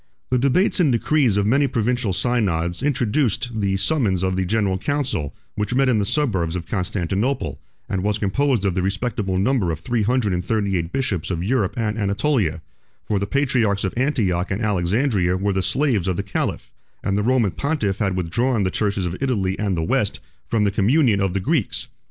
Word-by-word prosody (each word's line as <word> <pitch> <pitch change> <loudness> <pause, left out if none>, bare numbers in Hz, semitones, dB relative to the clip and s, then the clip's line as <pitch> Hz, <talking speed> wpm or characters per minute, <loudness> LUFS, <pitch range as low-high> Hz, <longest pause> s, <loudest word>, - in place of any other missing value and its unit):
The 125 - +3
debates 140 +11 +2
and 155 -6 +4
decrees 125 -2 +2
of 100 - +2
many 135 +6 +3
provincial 125 -3 0
synods 90 -6 0
introduced 125 -3 0
the 95 -1 +1
summons 100 - +1
of 95 0 0
the 95 -1 -1
general 100 -2 +1
council 130 - -2 0.2
which 105 +4 -2
met 135 0 +3
in 115 -4 +3
the 100 - 0
suburbs 95 - 0
of 85 -2 -4
Constantinople, 95 - -2 0.3
and 95 - -2
was 105 +1 0
composed 110 +2 +1
of 95 - +1
the 90 - 0
respectable 95 0 -1
number 100 -2 +1
of 80 -2 -2
three 115 +8 -1
hundred 110 -2 +1
and 90 0 -1
thirty 100 0 0
eight 85 -1 -2
bishops 120 - -1
of 85 -2 -2
Europe 105 -2 0
and 110 -1 -1
Anatolia; 100 - 0 0.4
for 105 -2 -1
the 100 - -2
patriarchs 120 -7 +1
of 95 - -1
Antioch 110 -9 0
and 100 +3 -2
Alexandria 95 -1 +1
were 100 +1 0
the 95 - 0
slaves 120 - +1
of 90 -2 0
the 100 - -1
caliph, 100 - -3 0.3
and 100 - 0
the 105 - +1
Roman 120 -3 +2
pontiff 140 - -1
had 100 -4 0
withdrawn 105 +7 0
the 95 - 0
churches 100 -2 -1
of 90 +1 -3
Italy 100 -9 0
and 100 -4 0
the 80 - 0
West - - 0 0.3
from 110 -2 +1
the 100 - +2
communion 110 +1 +3
of 95 -1 0
the - - +2
Greeks. 140 - -1
105 Hz, 195 wpm, -22 LUFS, 95-125 Hz, 0.4 s, and